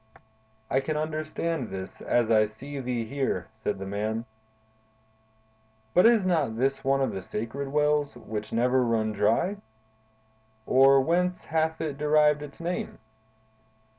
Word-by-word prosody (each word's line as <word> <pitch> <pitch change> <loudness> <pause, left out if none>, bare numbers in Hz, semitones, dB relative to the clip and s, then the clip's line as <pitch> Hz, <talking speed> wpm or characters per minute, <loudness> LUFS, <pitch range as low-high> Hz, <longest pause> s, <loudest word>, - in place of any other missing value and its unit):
"I 130 - +2
can 150 +3 -2
understand 155 -2 -2
this, 95 0 -7
as 120 -2 +1
I 110 -1 +5
see 135 +7 -8
thee 125 -3 -2
here," 135 +3 -2
said 105 - -1
the 95 - -6
man. 110 +3 -3 1.7
"But 180 - +6
is 230 -5 +4
not 155 -11 +1
this 135 +3 0
one 135 +1 +2
of 135 - +1
the 95 - -5
sacred 115 +9 -5
wells, 150 -1 +1
which 110 -2 -6
never 125 +3 +2
run 110 -2 0
dry? 105 - +1 1.1
or 135 +1 +6
whence 180 +5 0
hath 160 0 0
it 150 -3 -4
derived 150 0 +3
its 145 -1 -10
name?" 175 +2 -4
135 Hz, 135 wpm, -27 LUFS, 115-155 Hz, 1.7 s, But